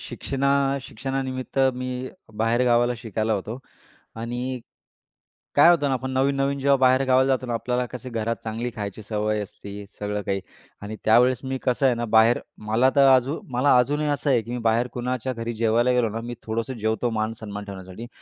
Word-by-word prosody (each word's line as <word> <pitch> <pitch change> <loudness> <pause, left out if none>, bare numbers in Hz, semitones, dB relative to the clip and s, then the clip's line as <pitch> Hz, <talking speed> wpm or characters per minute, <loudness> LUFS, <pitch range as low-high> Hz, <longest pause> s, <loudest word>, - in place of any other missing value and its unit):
शिक्षणा 140 0 -2 0.3
शिक्षणानिमित्त 135 -1 -4 0.2
मी 130 0 -4 0.5
बाहेर 120 +2 +2
गावाला 120 0 +3
शिकायला 110 -1 -2
होतो. 105 +4 -3 0.6
आणि 120 +3 -4 1.0
काय 145 +4 +8
होतं 145 -4 +2
ना - - +1
आपण 130 +1 -3
नवीन-नवीन 135 +1 +1
जेव्हा 140 +1 +4
बाहेर 130 0 +4
गावाला 130 +1 +4
जातो 130 -2 +1
ना, 120 - -2
आपल्याला 125 +2 -1
कसं 125 0 -7
घरात 115 0 -1
चांगली 115 +2 -3
खायची 105 0 -5
सवय 105 0 -1
असते 100 0 -9
सगळं 105 0 -2
काही. 100 -1 -2 0.4
आणि 105 +2 -6
त्यावेळेस 120 +3 +5
मी 130 0 -2
कसं 130 +1 +1
आहे 125 -2 +4
ना, 120 - -2
बाहेर 115 +2 +6 0.3
मला 120 +4 +4
तर 140 -1 +6
अजू 130 +5 0
मला 125 +2 +4
अजूनही 145 +4 +1
असं 145 0 -1
आहे, 125 -3 +4
की 115 +2 -9
मी 125 - -2
बाहेर 120 +2 +1
कुणाच्या 125 +1 -2
घरी 115 0 -4
जेवायला 115 +2 +2
गेलो 125 -3 +2
ना, 115 +2 -4
मी 120 +1 -6
थोडंसं 115 +4 -3
जेवतो 110 +2 0
मानसन्मान 110 -2 -4
ठेवण्यासाठी 95 +3 -9
120 Hz, 180 wpm, -24 LUFS, 110-130 Hz, 1.0 s, काय